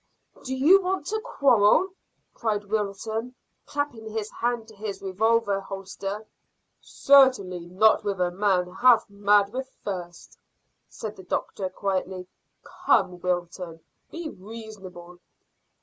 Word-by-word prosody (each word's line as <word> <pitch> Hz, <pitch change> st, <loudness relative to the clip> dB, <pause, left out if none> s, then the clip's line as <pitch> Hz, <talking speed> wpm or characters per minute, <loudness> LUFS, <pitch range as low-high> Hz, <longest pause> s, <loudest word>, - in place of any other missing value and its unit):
"Do 260 Hz, 0 st, -3 dB
you 330 Hz, +9 st, +6 dB
want 375 Hz, +1 st, -2 dB
to 435 Hz, +1 st, -1 dB
quarrel?" 280 Hz, -, +4 dB, 0.4 s
cried 210 Hz, -3 st, -2 dB
Wilton, 220 Hz, +3 st, -3 dB, 0.3 s
clapping 245 Hz, -7 st, -3 dB
his 215 Hz, -1 st, -4 dB
hand 235 Hz, -1 st, -2 dB
to 220 Hz, -, -15 dB
his 200 Hz, -1 st, -5 dB
revolver 205 Hz, +1 st, +1 dB
holster. 195 Hz, +2 st, -6 dB, 0.6 s
"Certainly 245 Hz, -11 st, +4 dB
not 215 Hz, +6 st, +4 dB
with 200 Hz, -2 st, -2 dB
a 180 Hz, -1 st, +1 dB
man 180 Hz, -1 st, +1 dB
half 235 Hz, +3 st, +4 dB
mad 205 Hz, +1 st, +3 dB
with 260 Hz, +1 st, -4 dB, 0.2 s
thirst," 175 Hz, -4 st, -7 dB, 0.5 s
said 215 Hz, -1 st, -7 dB
the 190 Hz, -, -11 dB
doctor 185 Hz, +1 st, -3 dB
quietly. 185 Hz, -1 st, -3 dB, 0.4 s
"Come, 180 Hz, -1 st, +1 dB
Wilton, 175 Hz, -2 st, -3 dB, 0.3 s
be 335 Hz, -1 st, -6 dB
reasonable." 190 Hz, -, -10 dB
205 Hz, 120 wpm, -26 LUFS, 185-230 Hz, 0.6 s, you